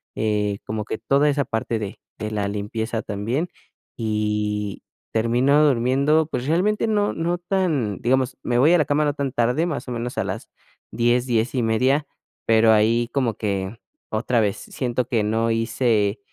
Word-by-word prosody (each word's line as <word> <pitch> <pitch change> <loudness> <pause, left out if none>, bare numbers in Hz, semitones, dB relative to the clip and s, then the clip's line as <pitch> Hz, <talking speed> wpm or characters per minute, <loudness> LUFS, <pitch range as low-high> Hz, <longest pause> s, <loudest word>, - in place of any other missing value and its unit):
eh, 105 -2 0
como 105 -1 -3
que 110 - -4
toda 140 +6 +3
esa 140 -1 +1
parte 115 0 -2
de 100 -2 -5 0.2
de 110 0 -4
la 105 -1 -1
limpieza 110 +2 -3
también. 115 - -2 0.5
Y 105 -2 -2 0.3
termino 125 +6 +3
durmiendo, 140 +4 +3
pues 125 -1 -3
realmente 200 +8 +2
no 205 -1 +1
no 170 +2 -1
tan 170 - 0
digamos, 130 +1 +1
me 120 -1 0
voy 155 +6 +5
a - - +6
la 155 - +2
cama 150 +1 +1
no 145 - +1
tan 140 -2 -2
tarde, 125 +6 +1
más 155 -6 -4
o - - -5
menos 120 +1 -4
a - - +1
las - - -5 0.4
10, 120 +1 +2
10:30 120 +4 +1 0.4
pero 110 0 +5
ahí 115 +3 +3
como 125 -6 0
que 100 +1 -3 0.3
otra 115 +2 +1
vez, 100 -2 0
siento 125 -1 -3
que 115 -4 +1
no 110 +2 +1
hice, 115 -2 +1
120 Hz, 165 wpm, -23 LUFS, 110-140 Hz, 0.5 s, a